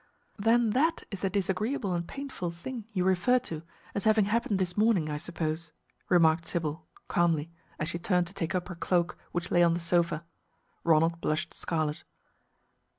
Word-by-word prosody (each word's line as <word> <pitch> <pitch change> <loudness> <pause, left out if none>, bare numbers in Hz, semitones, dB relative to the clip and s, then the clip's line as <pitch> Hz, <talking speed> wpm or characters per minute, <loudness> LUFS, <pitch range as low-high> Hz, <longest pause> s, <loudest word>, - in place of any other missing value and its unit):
"Then 225 +1 +4
that 315 +8 +2
is 195 - -4
the 195 - 0
'disagreeable 200 +3 0
and 170 -1 -2
painful 275 -10 -5
thing' 210 +7 -7
you 185 -4 0
referred 190 +7 +3
to, 160 -10 -4 0.3
as 200 - -2
having 215 -1 +5
happened 215 -1 +1
this 180 -2 -1
morning, 205 -8 +3
I 150 - -2
suppose," 160 -1 -3 0.4
remarked 165 -2 +4
Sybil, 160 -1 -3 0.2
calmly, 165 -2 +1 0.3
as 155 - -2
she 170 - -3
turned 180 0 +2
to 175 - -10
take 185 -1 -2
up 180 - -1
her 180 - -6
cloak 170 +1 +1 0.2
which 175 0 -3
lay 175 - +5
on 170 -1 +5
the 170 - -1
sofa. 170 -1 +1 0.6
Ronald 165 +1 +3
blushed 155 +3 -1
scarlet. 155 -3 -2
175 Hz, 170 wpm, -29 LUFS, 165-205 Hz, 0.6 s, having